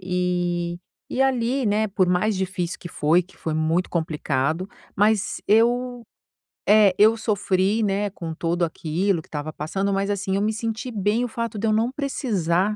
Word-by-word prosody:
e 175 -1 -1 0.3
e 255 - -2
ali, 260 -1 +1
né, 210 +1 +2
por 185 -2 +1
mais 180 +4 +2
difícil 185 -2 -3
que 175 - -7
foi, 160 +2 +2
que 180 - -21
foi 160 - -3
muito 160 +3 0
complicado, 160 0 -1 0.3
mas 210 0 +2
eu, 240 +3 +2 0.7
eh, 205 -3 +6
eu 215 +2 +6
sofri, 205 0 +1
né, 205 0 0
com 165 -3 -6
tudo 170 +2 0
aquilo 170 +3 -1
que - - -23
tava 150 +1 -5
passando, 195 +6 -2
mas 195 +1 0
assim, 195 -1 -1
eu 200 - +1
me 215 +1 +1
senti 225 +2 -3
bem 210 +2 0
o - - -2
fato 230 -1 -4
de 225 - 0
eu - - +3
não 225 +3 +1
precisar, 210 - 0
195 Hz, 175 wpm, -23 LUFS, 175-220 Hz, 0.7 s, eh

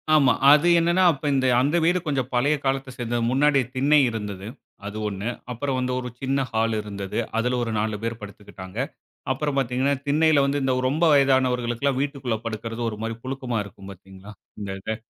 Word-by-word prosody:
ஆமா, 135 -5 +5 0.2
அது 150 +3 +5
என்னன்னா, 170 +3 +2
அப்ப 145 -2 -8
இந்த 135 -1 +1 0.2
அந்த 145 +6 +2
வீடு 175 +2 +3
கொஞ்சம் 135 -4 -1
பழைய 140 +5 +2
காலத்த 135 0 -1
சேர்ந்தது. 120 0 -2
முன்னாடி 140 +1 +3
திண்ணை 145 +3 +4
இருந்தது. 105 -3 -6 0.4
அது 105 +1 -6
1 100 +2 -3 0.2
அப்புறம் 130 +2 -2
வந்து 125 0 -1
ஒரு 125 -1 -5
சின்ன 135 +1 0
ஹாலு 115 0 +1
இருந்தது. 100 -2 -6 0.2
அதில 125 +2 +1
ஒரு 115 - -3
4 110 0 -1
பேர் 115 0 -3
படுத்துக்கிட்டாங்க. 100 -1 -11 0.5
அப்புறம் 145 +2 -2
பார்த்தீங்கன்னா, 130 +1 +1
திண்ணையில 150 0 +4
வந்து 140 +1 0 0.3
ரொம்ப 155 +5 +1
வயதானவர்களுக்குலாம் 130 -1 +2
வீட்டுக்குள்ள 135 -5 -2
படுக்கிறது 115 +1 -5
ஒருமாரி 115 +1 -5
புழுக்கமா 130 -3 -3
இருக்கும். 100 0 -12
பார்த்தீங்களா? 95 +2 -13 0.3
இந்த 100 -2 -5
இது. 110 +3 -3
125 Hz, 165 wpm, -24 LUFS, 110-140 Hz, 0.5 s, ஆமா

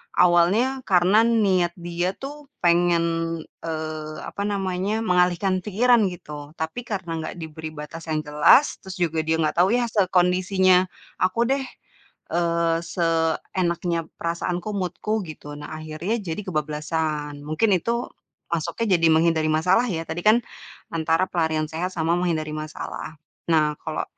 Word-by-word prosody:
awalnya 180 +10 +4
karena 195 +5 +5
niat 190 -7 +2
dia 175 +1 -2
tuh 290 +1 -9 0.2
pengen, 170 0 +4 0.6
eee, 155 -1 -4
apa 200 - -5
namanya, 200 +2 -1
mengalihkan 180 0 +2
pikiran 220 +2 +3
gitu. 150 -3 -8
Tapi 195 +10 -4
karena 190 -5 -4
nggak 160 - -5
diberi 160 0 -7
batas 160 +2 -8
yang 155 -1 -1
jelas, 150 - +4
terus 190 -1 -9
juga 160 -1 0
dia 160 - +3
nggak 160 +1 0
tahu 190 +6 +4
ya 245 - +2
sekondisinya 185 -1 +3 0.3
aku 185 +4 +1
deh, 275 0 +1 0.7
eee, 170 -1 +1
seenaknya 170 0 0
perasaanku, 175 +3 -2
mood-ku 200 +3 -2
gitu, 145 -1 -9
nah 155 - -7
akhirnya 155 +7 -3
jadi 175 +3 -4
kebablasan. 150 -2 -2
Mungkin 155 +8 +1
itu 235 +6 -2 0.4
masuknya 185 +5 0
jadi 165 - +4
menghindari 160 -1 +3
masalah 180 +8 +3
ya, 165 -5 -2
tadi 170 +2 -3
kan 215 +2 +6 0.6
antara 165 +2 +2
pelarian 160 -2 0
sehat 180 +4 -2
sama 165 +1 +1
menghindari 155 -4 -1
masalah. 155 +1 -6 0.4
Nah 150 -2 +3
kalo 155 - -2
175 Hz, 135 wpm, -24 LUFS, 160-190 Hz, 0.7 s, kan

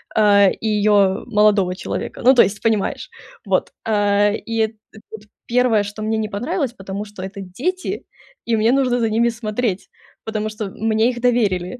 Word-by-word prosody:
а, 200 -2 +5
и 220 - -4
ее 205 -2 +2
молодого 210 -5 +2
человека. - - -5
Ну, 260 - +8
то - - +7
есть, 200 +1 -3
понимаешь. 220 -3 -1 0.4
Вот, - - 0
а, 205 -1 +2
и 225 +1 -4
эт 220 0 +1 0.2
т - - -17 0.5
1, 240 -3 +3
что 205 +1 -7
мне 220 0 0
не 215 -1 -2
понравилось, 265 - -2
потому 195 -1 -6
что 205 -2 -11
это 195 +1 -7
дети, 275 - -4 0.4
и 230 -1 +1
мне 225 +3 +3
нужно 255 -2 +2
за 225 -1 +1
ними 235 +2 +2
смотреть, 220 -3 -3 0.3
потому 215 -1 -3
что 215 -1 -5
мне 220 +2 +1
их 240 -1 -5
доверили. 230 -3 0
215 Hz, 175 wpm, -20 LUFS, 205-235 Hz, 0.5 s, Ну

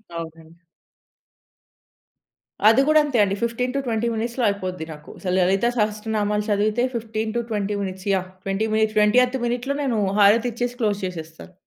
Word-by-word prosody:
అవునండి. 165 0 -9 2.1
అది 225 +4 +5
కూడా 310 0 +6
అంతే 285 -4 -1
అండి. 195 -1 0
15-20 235 0 -1
మినిట్స్‌లో 235 +3 -2
అయిపోద్ది 185 -4 -4
నాకు. 150 0 -14
అసలు 180 -2 -2
లలిత 190 +4 +2
సహస్ర 215 0 -1
నామాలు 210 0 0
చదివితే 210 +3 +1
15-20 220 -2 -2
మినిట్స్‌ 190 0 -5
యహ్‌! 185 -1 -1
20 195 +3 -1
మినిట్, 220 0 +1
20థ్ 245 +5 +4
మినిట్‌లో 245 +4 -2
నేను 240 -6 0 0.2
హారతి 225 +4 +5
ఇచ్చేసి 245 +1 -3
క్లోజ్ 205 -2 0
చేసేస్తాను. 165 -1 -8
215 Hz, 135 wpm, -23 LUFS, 195-235 Hz, 2.1 s, కూడా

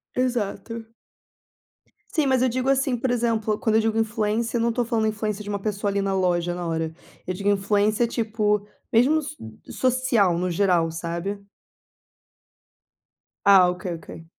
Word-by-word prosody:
Exato. 230 -2 -2 1.3
Sim, 305 -4 +2
mas 260 -2 +3
eu 260 - +4
digo 255 +2 -1
assim, 270 -1 +2
por 260 +2 -1
exemplo, 225 -3 0
quando 220 -1 +1
eu 220 - +5
digo 220 0 0
influência, 225 +1 0
eu - - 0
não 235 - +2
estou 240 +1 0
falando 225 -2 0
influência 215 -1 -2
de 205 - -8
uma 205 -1 -2
pessoa 205 0 -2
ali 200 0 0
na 195 0 -1
loja, 175 -2 +1
na 175 0 -4
hora. 160 -1 -2 0.3
Eu 185 - -1
digo 200 +2 -1
influência 205 +3 +2
tipo 215 -3 0 0.3
mesmo 250 +7 +5
no 315 - +2
so 275 - -8 0.5
social 235 -9 +2
no 180 +1 -1
geral, 175 -2 +2
sabe? 170 +5 -4 2.0
Ah, 190 -3 +7
ok, 180 +1 -5
ok. 165 0 -10
210 Hz, 165 wpm, -24 LUFS, 190-235 Hz, 2.0 s, Ah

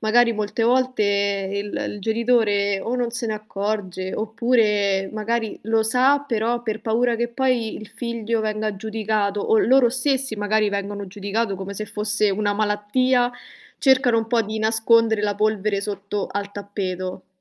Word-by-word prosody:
magari 235 +2 +4
molte 215 +1 -2
volte 255 0 +2 0.5
il 200 +1 -3
il 205 - -8
genitore 220 -3 +1
o 240 +5 -2
non 245 -1 -1
se 240 0 -3
ne 215 - -1
accorge, 200 -3 -4
oppure 215 -4 +1
magari 220 0 -2
lo 225 0 +2
sa 255 +6 +3
però 235 0 0
per 220 -2 -3
paura 235 +2 +1
che 235 +1 -1
poi 240 -3 0
il 215 - -9
figlio 230 -2 -2
venga 215 -1 -2
giudicato, 215 -1 -1
o 220 - +3
loro 250 0 +4
stessi 265 -1 0
magari 210 0 +1
vengono 200 0 -4
giudicato 200 +2 -2
come 195 +1 -6
se 215 +2 -4
fosse 210 0 0
una 205 +1 0
malattia, 220 +4 +1 0.5
cercano 255 -3 +4
un 225 - -2
po' 230 0 +2
di 220 +1 -4
nascondere 220 0 +3
la 205 -1 0
polvere 210 -1 0
sotto 200 0 -3
al 200 0 -4
tappeto. 185 -2 -5
215 Hz, 155 wpm, -22 LUFS, 205-235 Hz, 0.5 s, magari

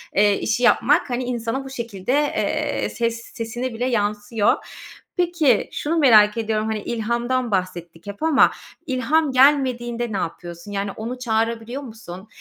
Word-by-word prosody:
eee, 205 0 +4
işi 220 +3 -1
yapmak, 275 +6 +3
hani, 245 +1 -1
insana 245 +1 -3
bu - - -7
şekilde, 235 -4 -4
eee, 295 +1 0
ses 230 -1 -2
sesine 240 +2 -4
bile 235 +2 -2
yansıyor. 210 -2 +1 0.6
Peki 335 -9 +2
şunu 320 +3 -2
merak 220 -7 +6
ediyorum: 220 -1 -1
Hani, 220 -1 -2
ilhamdan 235 +2 -1
bahsettik 175 -2 -3
hep 200 +7 -7
ama 320 -3 +5 0.4
ilham 280 +3 +1
gelmediğinde 250 -3 +2
ne - - -1
yapıyorsun? 175 +2 -6
Yani, 200 0 -2
onu 235 +5 -6
çağırabiliyor 230 +2 -1
musun? 215 -6 -10
235 Hz, 140 wpm, -22 LUFS, 210-255 Hz, 0.6 s, merak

